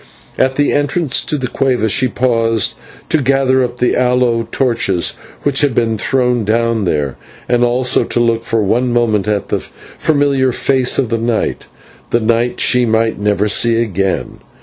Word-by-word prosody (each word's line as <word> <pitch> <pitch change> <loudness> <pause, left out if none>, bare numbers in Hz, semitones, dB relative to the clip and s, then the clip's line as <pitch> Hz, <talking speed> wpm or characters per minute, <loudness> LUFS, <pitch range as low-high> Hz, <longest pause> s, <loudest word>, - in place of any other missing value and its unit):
At 130 0 +1
the 145 +1 +1
entrance 145 0 0
to 150 - -2
the 130 - -3
/cueva/ 125 -3 0
she 130 +5 +1
paused 115 -3 0 0.4
to 160 - +2
gather 130 0 +2
up 125 0 -4
the 125 0 +1
aloe 125 -2 +1
torches 115 -9 0 0.3
which 140 -1 +1
had 140 -5 +1
been 115 -2 +1
thrown 125 -2 0
down 115 0 0
there, 75 -5 -1 0.3
and 120 0 +2
also 125 +1 +2
to - - -1
look 115 -1 +1
for 115 -2 0
one 120 +5 0
moment 110 -4 +1
at 105 -2 -1
the - - 0
familiar 140 -3 -1
face 130 0 +1
of 125 -4 -1
night, 115 0 -1 0.4
the 120 - +1
night 115 +2 0
that - - -2
she 125 0 +3
might 110 -1 0
never 105 0 +1
see 115 +2 +2
again. 95 -4 -2
120 Hz, 170 wpm, -15 LUFS, 115-130 Hz, 0.4 s, she